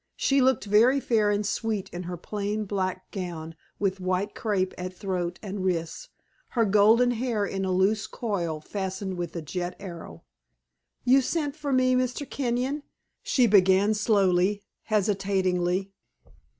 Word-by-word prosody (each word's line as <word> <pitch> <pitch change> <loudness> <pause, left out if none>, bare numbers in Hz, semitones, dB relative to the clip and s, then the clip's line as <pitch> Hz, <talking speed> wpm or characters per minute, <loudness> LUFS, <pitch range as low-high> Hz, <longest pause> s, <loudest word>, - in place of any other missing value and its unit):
She 275 0 +2
looked 260 -2 +2
very 230 +7 +4
fair 220 -5 +2
and 205 0 0
sweet 215 -1 -2
in 175 - -6
her 175 - -4
plain 210 +3 -3
black 185 -2 -3
gown 170 -4 -5 0.2
with 195 -1 -1
white 185 +2 -1
crape 190 -4 -1
at 180 0 -6
throat 180 -3 -2
and 195 -1 -4
wrists, 165 -3 -2 0.4
her 230 -3 +1
golden 215 +5 +5
hair 230 -3 -1
in 195 -1 -3
a 190 - -1
loose 195 +3 +2
coil 175 -9 -3
fastened 190 +1 -4
with 175 -1 -5
a 165 - -4
jet 175 +3 -4
arrow. 175 -4 -9 0.8
"You 260 +2 +6
sent 290 +1 -2
for 295 -2 -4
me, 255 -1 +3
Mr. 255 +2 -1
Kenyon?" 260 +2 -1 0.4
she 255 - +3
began 195 0 +5
slowly, 200 -2 +2 0.2
hesitatingly. 190 -3 0
200 Hz, 145 wpm, -26 LUFS, 185-225 Hz, 0.8 s, You